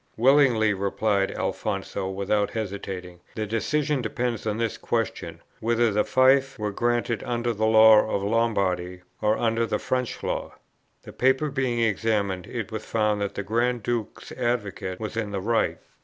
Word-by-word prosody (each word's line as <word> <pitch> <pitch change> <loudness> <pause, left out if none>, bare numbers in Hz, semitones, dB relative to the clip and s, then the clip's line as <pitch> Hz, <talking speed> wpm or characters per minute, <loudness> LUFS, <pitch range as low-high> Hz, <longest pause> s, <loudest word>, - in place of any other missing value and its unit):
'Willingly,' 120 -4 +4
replied 100 0 0
Alfonso, 95 -2 -3
without 100 +2 0
hesitating; 95 -4 -5 0.2
'the 110 - -2
decision 140 +6 0
depends 120 0 -2
on 105 0 -1
this 115 -1 -1
question - - -3 0.2
whether 115 0 +2
the 105 +1 +2
fief 135 +1 +3
were 105 -1 -2
granted 120 0 0
under 120 -1 -1
the 110 0 0
law 110 -1 +7
of 100 - -1
Lombardy, 95 -5 0 0.2
or 110 0 +2
under 115 0 +1
the - - 0
French 125 -1 -3
Law.' - - -3 0.5
The - - -11
paper 130 +3 +2
being 130 -4 0
examined, 105 -4 0
it 115 -4 -5
was 110 0 -4
found 105 -2 0
that 100 - -3
the 100 - -3
Grand 120 +3 0
Duke's 115 -1 -4
advocate 105 -6 -2
was 110 0 -5
in 115 -2 -2
the 100 -1 -3
right. 115 +4 0
110 Hz, 155 wpm, -25 LUFS, 100-120 Hz, 0.5 s, law